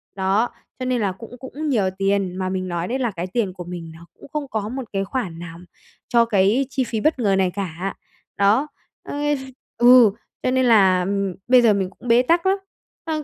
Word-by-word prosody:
Đó, 195 +5 +1 0.3
cho 255 - -3
nên 250 -2 0
là 200 - +1
cũng 230 +6 -11
cũng 295 +3 -5
nhiều 210 -8 +2
tiền, 195 -2 0
mà 185 -1 -2
mình 185 0 -3
nói 175 0 -3
đấy 260 +3 -2
là 240 -4 0
cái 180 -1 -5
tiền 195 -2 -1
của 180 - -8
mình 170 -2 -7
nó 170 - -14
cũng - - -15
không 300 -2 -3
có 215 -4 -3
một 260 +2 -4
cái 195 0 0
khoản 190 -6 -4
nào 170 0 -9 0.5
cho 235 -1 +4
cái 215 +5 +2
chi 265 -1 0
phí 230 -2 -3
bất 310 +4 +1
ngờ 200 -5 +2
này 185 -1 +2
cả. 190 -1 -4 0.4
Đó, 215 +9 +3 0.4
ơ - - -7 0.6
ừ, 240 -2 +7 0.3
cho 255 - +1
nên 260 0 +2
là, 190 -6 +5
ừm, 195 -1 -1
bây 250 0 +6
giờ 225 -3 +5
mình 190 -2 -1
cũng 220 +6 -13
bế 235 +1 +5
tắc 335 +7 +2
lắm. 385 +1 +3 0.5
Ờ, 310 -2 -2
205 Hz, 220 wpm, -22 LUFS, 190-250 Hz, 0.6 s, ừ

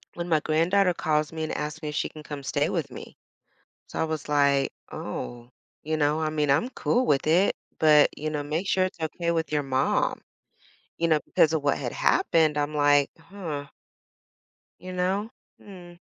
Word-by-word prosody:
when 175 0 -4
my 160 -3 +3
granddaughter 180 +5 +2
calls 155 -2 0
me 160 -1 -4
and 155 - -3
asked 150 +2 -4
me 150 - -4
if 150 - -6
she - - -1
can 155 -1 -12
come 145 -2 -7
stay - - 0
with - - -2
me. - - -10 0.7
So - - -6
I - - +2
was 160 -2 -4
like, 140 -2 +2 0.2
"Oh, 120 0 -6 0.3
you 155 +1 -1
know, 150 +1 +2
I 155 - 0
mean, 150 -2 0
I'm 195 - +2
cool 255 -1 0
with 135 +1 +2
it, 175 +5 +3 0.2
but, 150 -2 +6
you 155 +1 -3
know, 150 -1 -2
make 155 +6 -3
sure 185 0 +3
it's 185 - -9
okay 170 +2 -2
with 160 -3 -1
your 150 -1 +1
mom." 135 0 0 0.8
You 170 - +1
know, 155 - +4
because 160 0 +3
of 155 - 0
what 145 - +2
had - - -4
happened, 155 -2 +2
I'm 145 +1 -1
like, 145 -1 +4
"Huh" 165 -5 -7 1.1
you 185 +1 -8
know? 190 +4 -1 0.3
Mm. 175 -3 -12
155 Hz, 190 wpm, -26 LUFS, 145-170 Hz, 1.1 s, but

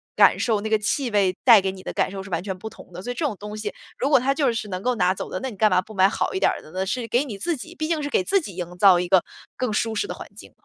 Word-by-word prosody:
感 - - +6
受， 220 -4 +1
那 220 - -3
个 220 - +4
气 245 +5 -1
味 195 -3 +2
带 230 -5 +8
给 190 0 -1
你 190 0 -11
的 - - -5
感 - - +1
受 195 0 -5
是 195 - -11
完 170 0 -1
全 190 -2 -4
不 220 +4 -7
同 - - -15
的。 180 - -7
所 245 - -4
以 - - -3
这 330 - -3
种 265 - -1
东 210 +1 -7
西， 215 -1 -4 0.3
如 275 - +1
果 290 - +6
它 265 +3 +1
就 275 -3 +1
是 225 -2 -4
能 185 -1 -4
够 250 0 +1
拿 185 -3 +2
走 - - -6
的， 185 - -4
那 265 - -3
你 - - -10
干 215 +2 +4
嘛 185 - +4
不 215 - -13
买 190 -1 +4
好 - - -2
一 380 - -1
点 - - +3
儿 - - -5
的 155 - -15
呢， 185 +2 -2
是 235 +3 -2
给 240 +4 +2
你 220 -8 -6
自 330 - -1
己 330 +6 -10
毕 310 -2 -3
竟 325 -2 0
是 290 - -2
给 190 - +1
自 395 - +2
己 200 - -8
营 175 -1 -6
造 190 -3 +7
一 180 - -2
个 185 0 +5 0.3
更 255 -3 -2
舒 225 +1 0
适 405 - -1
的 - - -4
环 - - -9
境。 - - -13
210 Hz, 380 characters per minute, -23 LUFS, 190-255 Hz, 0.3 s, 带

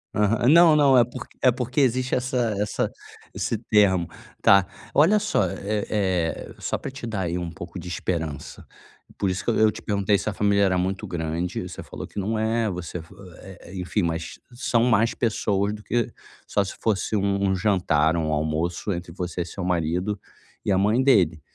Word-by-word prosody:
Aham, 105 +3 +2
não 165 +2 +7
não, 140 -3 +5
é 120 - +7
porque 125 +1 -9
é 130 - +5
porque 125 +3 -1
existe 130 0 +1
essa 125 -4 0
essa 105 0 -1 0.4
esse 115 - -2
termo, 100 -6 +3 0.4
tá, 100 -1 +6 0.3
olha 165 +9 +5
só, 205 - +1
eh 100 +3 -3
eh, 95 -6 -1
só - - -2
pra - - -6
te 135 -3 -7
dar 110 -4 -3
aí 85 -2 -2
um 85 -1 -4
pouco 85 +2 -8
de 90 - -9
esperança. 80 -5 -4 0.5
Por 100 - 0
isso 95 - -3
que - - -1
eu - - 0
eu 110 0 +5
te - - -9
perguntei 100 -1 +1
se - - -2
a - - -4
família 100 +1 +2
era 95 -1 +2
muito 95 +1 -2
grande, 85 +1 -3
você - - -8
falou - - -8
que - - -6
não 110 +3 -1
é, 110 0 +1
você 90 -2 -5
fa 80 +4 -16 0.3
eh 95 -1 -11
eh - - -10
enfim 90 +3 -1
mas 80 -1 -3
são 120 -1 +1
mais 115 -1 +3
pessoas 105 -3 0
do 105 - -8
que 120 +1 -1 0.4
só 100 - +1
se 95 - -7
fosse 110 0 0
um 100 -1 +1
jantar 90 -6 +2
ou 85 - 0
um 80 - -1
almoço 80 +5 -1
entre 85 0 -6
você 90 0 -4
e - - -2
seu 90 +2 -6
marido, 90 +3 -1 0.4
e - - 0
a 95 - +3
mãe 105 +6 +3
dele, 90 - +3
100 Hz, 200 wpm, -24 LUFS, 90-115 Hz, 0.5 s, não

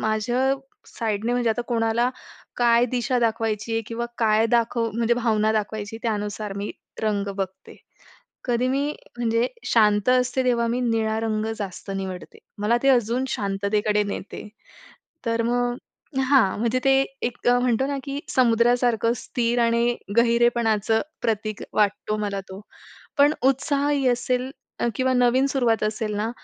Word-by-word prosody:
माझ्या 240 +5 +1 0.3
साईडने, 225 0 -2
म्हणजे 245 -2 +1
आता 225 +2 -1
कोणाला 230 0 +1 0.5
काय 240 0 +4
दिशा 250 0 0
दाखवायची 225 -1 -1
आहे 225 0 0
किंवा 235 +1 -3
काय 220 -1 +3
दाखव 230 0 +1
म्हणजे 235 +1 +2
भावना 220 -3 +1
दाखवायची, 215 +1 -3
त्यानुसार 210 -2 -3
मी 200 +1 -3 0.3
रंग 205 -2 0
बघते. 190 -1 -6 0.7
कधी 245 0 +1
मी, 275 +2 0 0.3
म्हणजे 230 0 +1 0.2
शांत 210 -1 +3
असते, 255 +1 +2
तेव्हा 235 -2 +2
मी 240 +2 -1
निळा 225 -2 0
रंग 215 -1 -1
जास्त 195 -1 -6
निवडते. 190 -2 -6 0.2
मला 210 +3 +2
ते 275 - +3
अजून 245 0 +2
शांततेकडे 205 0 0
नेते. 205 +1 -6 0.8
तर 230 0 +1
मग 245 +1 0 0.5
हां. 245 -10 +4
म्हणजे 235 +3 +1
ते 270 - +5 0.3
एक 240 0 -4
म्हणतो 245 +1 +2
ना, 280 0 -2
की 280 0 -4
समुद्रासारखं 235 -2 +3
स्थिर 240 0 -1
आणि 235 +1 +2 0.2
गहिरेपणाचं 235 -2 +3 0.2
प्रतीक 215 -2 -2
वाटतो 210 0 +1
मला 200 -2 -2
तो. 190 +1 -9 0.6
पण 285 +1 +6
उत्साहही 280 +1 +1
असेल, 250 +1 0 0.3
अ - - +1
किंवा 260 0 +1
नवीन 250 +2 +3
सुरुवात 245 -5 +1
असेल 215 0 -2
ना, 215 +2 -1
230 Hz, 140 wpm, -24 LUFS, 215-245 Hz, 0.8 s, पण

